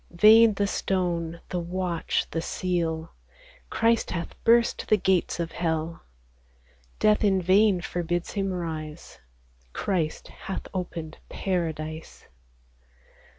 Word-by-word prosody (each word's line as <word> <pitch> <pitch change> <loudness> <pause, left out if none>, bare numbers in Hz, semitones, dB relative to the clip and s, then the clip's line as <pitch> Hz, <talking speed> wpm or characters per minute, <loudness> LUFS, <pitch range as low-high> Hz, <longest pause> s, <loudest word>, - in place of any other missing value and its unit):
Vain 215 +4 +7
the 200 - +1
stone, 170 -4 -1
the 180 - -2
watch, 175 -1 -1
the 165 - -1
seal: 165 -2 -2 0.6
Christ 230 0 +2
hath 170 -1 -4
burst 235 0 +3
the 215 - +5
gates 185 -3 +1
of 165 -1 -2
hell; 165 -1 -2 1.0
Death 215 0 +3
in 195 -2 +3
vain 190 +1 +4
forbids 175 0 -2
Him 195 -2 -1
rise; 160 -3 -6 0.5
Christ 165 -6 -2
hath 195 - -6
opened 170 -4 -5
Paradise. 160 -4 -3
175 Hz, 110 wpm, -26 LUFS, 165-195 Hz, 1.0 s, Vain